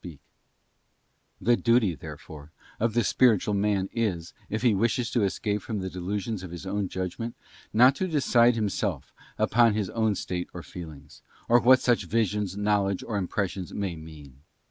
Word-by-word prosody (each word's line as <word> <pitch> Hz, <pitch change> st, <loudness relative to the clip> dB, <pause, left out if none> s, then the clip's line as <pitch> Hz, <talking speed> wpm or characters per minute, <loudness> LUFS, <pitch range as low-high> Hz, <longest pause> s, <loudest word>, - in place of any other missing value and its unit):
BOOK 85 Hz, -5 st, -9 dB, 1.2 s
The 120 Hz, +1 st, +3 dB
duty, 115 Hz, -6 st, +2 dB
therefore, 75 Hz, 0 st, -10 dB, 0.3 s
of 115 Hz, 0 st, 0 dB
the 120 Hz, -, +3 dB
spiritual 105 Hz, -2 st, +3 dB
man 100 Hz, -1 st, +1 dB
is, 95 Hz, -8 st, -2 dB, 0.2 s
if 110 Hz, +3 st, -3 dB
he 120 Hz, -3 st, +4 dB
wishes 115 Hz, +4 st, 0 dB
to 120 Hz, -, +1 dB
escape 105 Hz, +1 st, -1 dB
from 110 Hz, +2 st, -4 dB
the 95 Hz, -1 st, -4 dB
delusions 100 Hz, +3 st, -3 dB
of 95 Hz, -, -8 dB
his 85 Hz, +2 st, -8 dB
own 100 Hz, 0 st, -2 dB
judgment, 95 Hz, +6 st, -4 dB, 0.4 s
not 125 Hz, +5 st, +6 dB
to 190 Hz, -, -1 dB
decide 125 Hz, -7 st, +3 dB
himself 100 Hz, -, -2 dB, 0.2 s
upon 115 Hz, -1 st, +3 dB
his 105 Hz, -4 st, -2 dB
own 110 Hz, -2 st, +1 dB
state 90 Hz, -1 st, -4 dB
or 90 Hz, -, -6 dB
feelings, 75 Hz, -5 st, -11 dB, 0.3 s
or 120 Hz, +1 st, +6 dB
what 130 Hz, +2 st, +6 dB
such 120 Hz, -2 st, +2 dB
Visions, 105 Hz, -3 st, -1 dB
Knowledge, 100 Hz, -2 st, +1 dB
or 110 Hz, -, -4 dB
Impressions 95 Hz, -1 st, -3 dB
may 100 Hz, -4 st, -2 dB
mean. 75 Hz, -4 st, -12 dB
105 Hz, 165 wpm, -27 LUFS, 90-115 Hz, 1.2 s, not